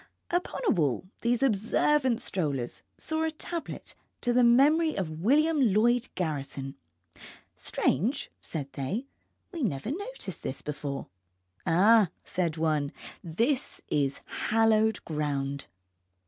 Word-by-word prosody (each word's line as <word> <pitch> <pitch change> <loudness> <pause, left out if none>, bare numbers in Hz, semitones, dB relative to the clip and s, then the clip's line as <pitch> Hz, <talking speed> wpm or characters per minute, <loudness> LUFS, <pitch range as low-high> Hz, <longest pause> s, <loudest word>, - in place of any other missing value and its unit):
_). - - +1
Upon 355 - -1
a - - +6
wall 155 - +1 0.2
these 240 +2 +1
observant 250 +3 +2
strollers 140 -10 -2 0.2
saw 315 0 -2
a 320 - +2
tablet 330 +2 -6 0.3
to 245 - +1
the 250 0 +5
memory 295 +7 +5
of 160 -4 -3
William 300 - +4
Lloyd 240 +3 +3
Garrison. 140 -5 -3 0.8
Strange, 230 - 0
said 140 -4 -5
they, 170 - -3 0.5
we 340 -4 -5
never 200 - -1
noticed 400 - -5
this 130 - -5
before. 145 -1 -4 0.6
Ah, 205 +3 +6
said 170 -3 -1
one, 155 -3 +1 0.3
this 235 - 0
is 140 -2 0
hallowed 220 -1 +2
ground. 140 -3 -2
210 Hz, 120 wpm, -29 LUFS, -, 0.8 s, a